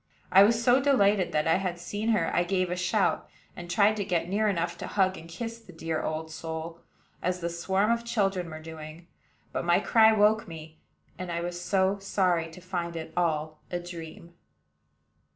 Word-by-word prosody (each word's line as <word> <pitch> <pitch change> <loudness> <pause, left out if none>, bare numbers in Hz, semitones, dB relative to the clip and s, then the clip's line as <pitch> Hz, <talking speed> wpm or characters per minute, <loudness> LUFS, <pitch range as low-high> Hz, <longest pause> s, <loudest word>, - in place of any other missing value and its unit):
I 190 - +8
was 225 +3 +4
so 250 +3 +5
delighted 205 -9 +3
that 150 +1 0
I 165 - +4
had 185 -2 -2
seen 205 +5 -3
her 200 -7 +1
I 175 - +3
gave 185 0 0
a - - 0
shout, 180 +3 0 0.3
and 175 0 -8
tried 210 +3 +4
to 205 - -1
get 175 -3 -1
near 210 +4 +1
enough 170 -3 -1
to - - -5
hug 190 -2 +1
and 165 -1 -11
kiss 230 +6 -6
the 225 - -15
dear 165 -1 -3
old 160 +1 -4
soul, 165 +1 -6 0.4
as 180 +1 -1
the 170 -1 -3
swarm 190 +5 +1
of 235 0 0
children 195 -6 0
were 155 0 -7
doing; 160 +1 -10 0.5
but - - -2
my 175 +1 +4
cry 220 +1 +5
woke 215 +1 +3
me, 160 -1 -10 0.4
and 185 -1 -4
I 170 0 -2
was 175 0 -4
so 190 +2 +1
sorry 180 -4 +1
to 165 +3 -13
find 175 -2 -4
it 160 -1 -6
all 155 -3 -1
a 175 - -2
dream! 170 -1 -9
180 Hz, 195 wpm, -28 LUFS, 165-200 Hz, 0.5 s, I